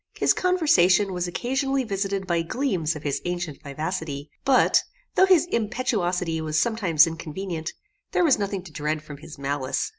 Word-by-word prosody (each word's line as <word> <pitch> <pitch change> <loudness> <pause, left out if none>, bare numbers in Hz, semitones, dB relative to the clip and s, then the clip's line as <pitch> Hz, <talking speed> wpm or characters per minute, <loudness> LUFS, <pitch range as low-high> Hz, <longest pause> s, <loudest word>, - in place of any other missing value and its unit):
His - - +3
conversation 205 - +3
was 180 0 -2
occasionally 270 - -1
visited 195 -3 -2
by 170 -2 +1
gleams 175 - -1
of 150 - -8
his 145 -2 -2
ancient 175 -4 -4
vivacity; 150 0 -4
but, 270 -2 +4 0.3
though 380 - +5
his 355 -4 +5
impetuosity 180 -7 -1
was 155 0 0
sometimes 185 -8 +4
inconvenient, 165 +1 -5 0.4
there - - +2
was 290 -9 +4
nothing 200 -2 -2
to 180 - -12
dread 155 0 -2
from 150 -2 -9
his 155 +1 -11
malice. 140 - -2
180 Hz, 155 wpm, -25 LUFS, 155-220 Hz, 0.4 s, though